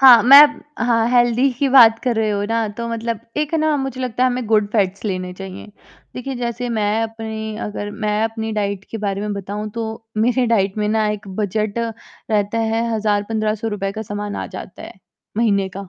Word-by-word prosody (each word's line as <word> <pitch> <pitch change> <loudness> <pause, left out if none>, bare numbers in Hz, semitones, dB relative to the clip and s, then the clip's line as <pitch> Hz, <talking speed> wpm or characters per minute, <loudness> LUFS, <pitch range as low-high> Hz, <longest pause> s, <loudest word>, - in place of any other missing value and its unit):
हाँ, 250 -4 +9
मैं 275 +5 +10 0.4
हाँ, 230 -1 +2
हेल्दी 245 +2 +3
की 280 - +2
बात 230 -4 +7
कर 245 -2 +1
रहे 220 -1 +1
हो 205 0 -1
ना, 230 -1 0
तो 235 +3 -6
मतलब 230 -1 -3 0.2
एक 300 +1 -1
ना 310 -2 +2
मुझे 270 -2 -4
लगता 250 -1 -2
है 255 - +5
हमें 245 -2 -3
गुड 215 -1 +3
फैट्स 200 -2 0
लेने 185 -3 -3
चाहिए। 190 0 -9 0.5
देखिए 265 +2 -5
जैसे 240 0 -3
मैं 215 -1 0
अपनी 220 -1 -5
अगर 205 0 -4
मैं 210 0 +1
अपनी 225 0 -3
डाइट 200 -2 -2
के 225 - -5
बारे 200 -2 -2
में 210 0 -3
बताऊँ 205 +2 -5
तो, 225 0 -6
मेरे 245 +3 +2
डाइट 200 -3 +1
में 210 - 0
ना 215 0 +1
एक 210 -1 -6
बजट 210 +1 -1 0.5
रहता 210 +1 +1
है 225 +1 0
1000-1500 215 +1 -1
रुपए 195 -2 -3
का 220 +1 -5
सामान 205 -1 -5
आ - - -4
जाता - - -9
है, - - -9 0.4
महीने 200 -4 +2
का। 200 -1 -7
220 Hz, 195 wpm, -20 LUFS, 205-235 Hz, 0.5 s, मैं